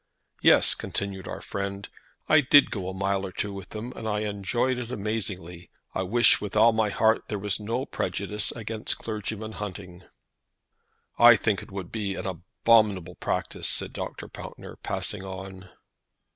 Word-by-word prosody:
"Yes," - - +6
continued 100 -2 -4
our - - -6
friend, 100 0 -4 0.4
"I 155 -1 +6
did 145 +1 +6
go 95 -5 -3
a - - -5
mile 95 0 0
or 95 - -4
two 100 +2 -3
with 95 -1 -8
them, 115 +4 -6
and 110 - -5
I 105 0 0
enjoyed 110 +5 0
it 120 -2 -5
amazingly. 95 -6 -4 0.2
I - - -1
wish 115 +6 +5
with 105 -1 -5
all 110 +2 +6
my 110 -1 +2
heart 110 +2 +2
there 105 - -2
was 100 +1 -1
no 115 +5 -2
prejudice 100 -1 -2
against 110 -1 -3
clergymen 110 0 -4
hunting." 95 -4 -7 1.2
"I 120 0 +10
think 105 -4 0
it - - -12
would 95 -3 -6
be 100 -3 -2
an - - -5
abominable 95 0 +2
practise," - - -3
said - - 0
Dr. - - -6
Pountner, - - -9
passing 105 -2 -2
on. 95 0 -8
105 Hz, 160 wpm, -27 LUFS, 95-110 Hz, 1.2 s, I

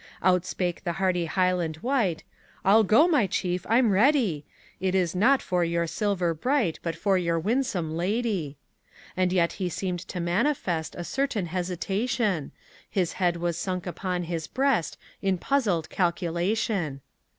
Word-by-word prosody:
Outspake 180 -1 +1
the 175 -3 -1
hardy 180 -2 0
Highland 180 -2 0
wight, 235 - 0 0.4
"I'll 215 +3 +6
go, 220 - +5
my 290 - +3
chief, 180 -1 -2
I'm 230 -1 +4
ready; 205 - +3 0.3
It 190 +1 0
is 180 -3 +1
not 245 +9 +3
for 180 -1 +1
your 170 0 0
silver 180 0 0
bright, 235 - 0
But 165 -1 -3
for 190 +2 +1
your 170 -1 0
winsome 185 -5 -1
lady." 185 - -1 0.6
And 185 -1 +1
yet 175 -2 +2
he 180 - 0
seemed 180 +1 -3
to 180 - -5
manifest 175 - 0
A 175 - -5
certain 260 -2 -1
hesitation; 185 - -1 0.4
His 180 -4 0
head 175 -2 +1
was 170 -1 -2
sunk 185 -2 -3
upon 180 0 -3
his 165 -2 -4
breast 265 - 0 0.2
In 195 -2 +1
puzzled 200 - 0
calculation. 175 -3 -1
180 Hz, 145 wpm, -26 LUFS, 170-210 Hz, 0.6 s, I'll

